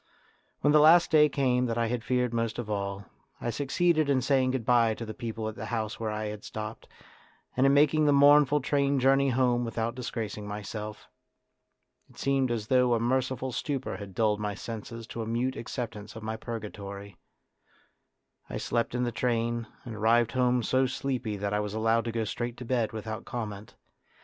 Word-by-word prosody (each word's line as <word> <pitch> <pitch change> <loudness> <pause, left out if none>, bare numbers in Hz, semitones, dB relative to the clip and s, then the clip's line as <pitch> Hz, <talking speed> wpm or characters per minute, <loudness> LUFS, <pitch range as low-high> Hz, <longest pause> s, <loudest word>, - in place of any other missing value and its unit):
When 145 - +3
the 150 - +7
last 165 +3 +6
day 150 -1 +6
came 125 -3 +1
that 115 0 -2
I 115 - +2
had 115 0 -2
feared 125 -1 0
most 115 -1 -1
of 115 -3 -4
all, 100 -1 -3 0.3
I 120 - -2
succeeded 155 +4 +1
in 135 -2 +3
saying 130 -1 +2
goodbye 120 -3 +2
to 115 - -6
the 110 - -6
people 115 -1 -4
at 110 - -4
the - - -7
house 110 -2 -3
where 110 -1 -2
I 105 0 -3
had 105 0 -6
stopped, 110 +1 -7 0.7
and 130 +2 +4
in 135 - +4
making 150 +1 +4
the - - +5
mournful 145 0 +6
train 140 0 +1
journey 135 +1 +4
home 125 -1 +2
without 115 0 -2
disgracing 110 -4 -5
myself. 105 +1 -6 1.0
It - - -21
seemed 135 -2 +1
as 115 -3 -2
though 125 0 +3
a - - 0
merciful 130 +2 0
stupor 135 +1 -3
had 100 -3 -9
dulled 105 -2 +2
my 105 -1 -3
senses 115 +1 -7
to 115 0 -6
a 110 - -4
mute 120 +3 -1
acceptance 110 -4 -6
of 110 - -8
my 110 0 -3
purgatory. 100 -4 -7 1.3
I - - -4
slept 120 +1 -1
in 125 - 0
the 120 - -1
train, 115 0 -1 0.2
and 120 - -6
arrived 115 +2 +3
home 125 -1 +2
so 130 +3 +2
sleepy 125 -5 -3
that 100 +1 -2
I 105 - +1
was 105 0 -3
allowed 115 +1 +2
to 115 - -2
go 115 0 -1
straight 120 +2 -4
to 125 - -7
bed 120 -2 0
without 110 +1 -5
comment. 105 -3 -6
120 Hz, 190 wpm, -28 LUFS, 110-130 Hz, 1.3 s, the